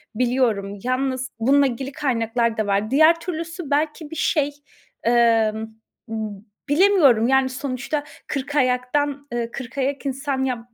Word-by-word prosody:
biliyorum. 230 -5 0
Yalnız 255 0 -1
bununla 275 +4 +4
ilgili 265 +2 -4
kaynaklar 235 -5 0
da 215 - 0
var. 205 +2 0
Diğer 315 +4 +5
türlüsü 335 -1 -5
belki 300 +1 0
bir 320 - -6
şey, 290 -4 +1 0.5
emm, 225 -2 +3 0.5
ıb 215 -3 -5 0.3
bilemiyorum, 290 - +5
yani, 265 0 +3
sonuçta 270 +2 -3 0.2
kırkayaktan, 280 +1 0
eee, 235 -1 -3
kırkayak 275 +3 -3
insan 270 0 -2
yap 250 -3 -1
265 Hz, 125 wpm, -22 LUFS, 235-290 Hz, 0.5 s, Diğer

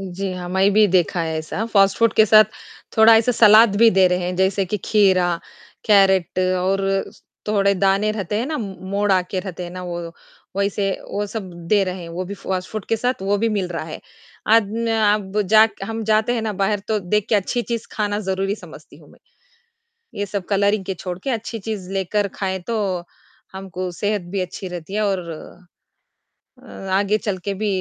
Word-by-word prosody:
जी, 190 0 -4
हाँ, 180 -1 -6
मैं 190 +2 +3
भी 215 +1 +5
देखा 180 -1 +1
है 160 -1 -2
ऐसा। 155 +7 -4
फ़ास्ट 195 -3 +3
फ़ूड 230 -1 +3
के 220 - +6
साथ 215 +1 +7 0.5
थोड़ा 225 +1 +8
ऐसा 230 +2 +2
सलाद 215 -1 +6
भी 230 +2 +6
दे 190 -1 +4
रहे 180 0 +1
हैं, 180 0 -3
जैसे 190 +1 +1
कि 200 +4 -2
खीरा, 185 -5 +3 0.5
कैरट 190 -4 +3 0.2
और 195 +1 0 0.4
थोड़े 200 -1 +2
दाने 195 +2 +2
रहते 210 -1 -3
हैं 235 - -2
ना, 310 +1 -3
मोड़ 200 0 -3
आके 185 0 0
रहते 185 -2 -7
हैं 175 - -7
ना, 185 +1 -7
वो, 170 -1 -6 0.4
वैसे 200 0 0 0.2
वो 205 +1 -2
सब 205 -3 -6 0.2
दे 210 -2 +4
रहे 185 -1 -5
हैं, 170 - -8
वो 175 +2 -4
भी 195 +2 -6
फ़ास्ट 185 -1 -4
फ़ूड 215 -3 -5
के 225 - +1
साथ 245 -2 -2
वो 200 +1 +1
भी 230 +2 +1
मिल 200 -4 -1
रहा 165 -2 -4
है। 160 - -8 0.5
अद 225 -3 +4
न 230 0 -1
आब 210 -2 +1
जाक 215 +3 +5
हम 225 +2 -4
जाते 220 +2 +2
हैं 230 - -2
ना 220 -1 -2
बाहर, 200 +1 0
तो 215 +1 -1
देख 205 +3 -1
के - - +2
अच्छी 210 +4 0
चीज़ 235 -1 -4
खाना 205 -1 -1
ज़रूरी 195 0 -1
समझती - - -14
हूँ - - -18
मैं। - - -20 1.0
ये 205 - 0
सब 195 -2 -4
कलरिंग 200 0 +1
के 190 - -2
छोड़ 180 0 -6
के 270 - -5
अच्छी 230 -1 -3
चीज़ 200 -3 -6
लेकर 195 +2 0
खाएँ, 190 -1 -2
तो 195 -3 -2 0.5
हमको 185 -1 -5
सेहत 205 +3 -2
भी 200 - 0
अच्छी 185 +1 -6
रहती 175 +1 -8
है 215 - 0
और 185 -4 -2
अ 175 +3 -10 1.0
अ, 195 -4 -10
आगे 200 +2 +2
चल 205 -3 -3
के 200 - -1
भी 210 +2 -3
195 Hz, 205 wpm, -21 LUFS, 185-215 Hz, 1.0 s, थोड़ा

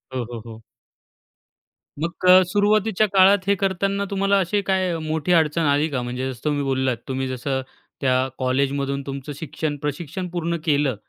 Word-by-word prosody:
हो, 125 - -1
हो, 115 - -5
हो. 115 -1 -10 1.4
मग 165 +2 -1 0.2
क 185 +1 +8
सुरुवातीच्या 210 +1 +2
काळात 195 0 +5
हे 200 - +4
करतांना 195 +1 -1
तुम्हाला 195 0 +2
अशी 195 +3 0
काय 185 -3 +1
मोठी 160 +2 -1
अडचण 160 0 +3
आली 145 +2 +2
का? 130 -3 -2
म्हणजे 125 +2 -3
जसं 120 - -11
तुम्ही 145 -1 0
बोललात 130 -2 0
तुम्ही 130 -1 -2
जसं, 130 +1 -2 0.4
त्या 130 -1 +2
कॉलेजमधून 140 +1 0
तुमचं 140 +1 -6
शिक्षण, 155 0 -4
प्रशिक्षण 160 +5 -4
पूर्ण 170 -1 -2
केलं 145 -4 +2
150 Hz, 155 wpm, -22 LUFS, 135-185 Hz, 1.4 s, क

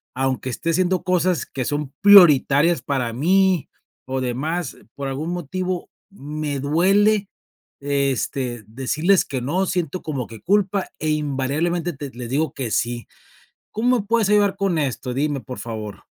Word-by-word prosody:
aunque 130 0 -1
esté 165 +6 -3
haciendo 180 +2 +1
cosas 180 -1 +1
que 130 -2 -5
son 145 0 -2
prioritarias 170 -5 +6
para 130 -4 -2
mí 180 +5 +2 0.4
o 130 0 -2
demás, 145 +6 -3 0.2
por 140 -1 -4
algún 150 +5 -3
motivo 180 +2 -3 0.2
me 150 -5 -5
duele, 195 +8 +3 0.5
este, 135 -4 -1
decirles 155 - +1
que 130 -2 -4
no. 175 +10 0
Siento 180 -2 -2
como 135 -6 -3
que 115 -1 -12
culpa 195 0 +1
e, 155 - -1
invariablemente, 155 +4 -1
te 140 -1 -7
les 120 -1 -7
digo 145 +2 0
que 130 -4 -4
sí. 120 +2 -1 0.6
¿Cómo 245 +3 +2
me - - -11
puedes 225 -1 +2
ayudar 205 -1 +3
con 195 -4 0
esto? 130 -3 -2
Dime, 145 +2 -1
por 125 +1 -8
favor. 110 -3 -7
150 Hz, 150 wpm, -22 LUFS, 130-185 Hz, 0.6 s, prioritarias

